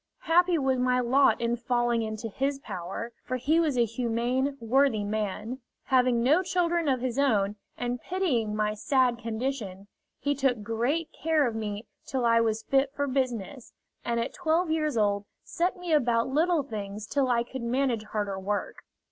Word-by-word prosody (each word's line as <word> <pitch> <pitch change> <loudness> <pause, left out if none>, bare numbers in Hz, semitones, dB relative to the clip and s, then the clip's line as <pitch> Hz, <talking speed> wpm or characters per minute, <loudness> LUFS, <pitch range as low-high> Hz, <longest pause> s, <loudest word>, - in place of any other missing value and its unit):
Happy 350 +1 +3
was 265 -3 +1
my 250 0 +2
lot 260 +3 +4
in 235 0 0
falling 240 -1 0
into 220 +1 -4
his 275 +6 -1
power, 195 0 -6
for 255 - -2
he 300 +7 +2
was 305 -6 +1
a 240 - +4
humane, 245 +4 -1
worthy 235 -1 +2
man. 215 +3 -3 0.2
Having 250 -3 +3
no 300 +8 +4
children 345 -3 0
of 260 -2 +1
his 255 0 -2
own, 210 -7 +2 0.2
and 245 0 -3
pitying 255 - -1
my 210 0 0
sad 250 +2 +1
condition, 220 -4 -4 0.3
he 285 - 0
took 260 -5 0
great 245 +10 -1
care 315 -2 +1
of 235 - -1
me 210 -1 -4 0.2
till 260 -2 -2
I 230 0 +5
was 220 -1 0
fit 270 0 +2
for 285 - 0
business, 255 -2 -3 0.3
and 235 0 -1
at 230 - -2
twelve 335 -1 +1
years 305 -5 0
old 205 -1 +1 0.2
set 360 +3 -1
me 355 -2 -2
about 240 -5 +3
little 320 +3 +2
things 210 -4 -6
till 270 +3 0
I 235 -2 +2
could 260 +1 -7
manage 235 -2 0
harder 205 -2 -3
work. 205 +2 -3
245 Hz, 175 wpm, -28 LUFS, 225-280 Hz, 0.3 s, I